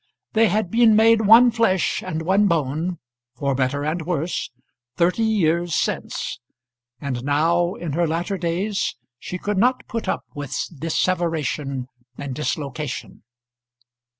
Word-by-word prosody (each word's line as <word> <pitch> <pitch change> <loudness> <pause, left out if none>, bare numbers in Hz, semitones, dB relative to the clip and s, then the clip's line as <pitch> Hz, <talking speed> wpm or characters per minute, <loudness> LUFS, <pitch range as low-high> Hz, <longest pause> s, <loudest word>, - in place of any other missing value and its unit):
They 225 +1 +5
had 210 -4 0
been 230 -2 +5
made 220 -1 +5
one 235 +3 +8
flesh 225 -6 +1
and 160 +1 -4
one 195 +4 +3
bone, 165 +1 -1 0.4
for 140 +2 -1
better 135 +2 0
and 160 +3 -1
worse, 165 0 -2 0.5
thirty 175 +5 +2
years 175 -6 +1
since; - - -2 0.6
and 130 -4 -4
now 170 +5 +2
in 165 -5 -5
her 170 +2 +1
latter 175 +4 -2
days 185 +5 -1 0.2
she 180 - -5
could 205 +1 -2
not 250 +4 +2
put 230 -1 -4
up - - -1
with 145 -2 -6 0.3
disseveration 160 -5 -1 0.3
and 140 -2 -5
dislocation. 145 -1 -4
170 Hz, 130 wpm, -22 LUFS, 150-205 Hz, 0.6 s, one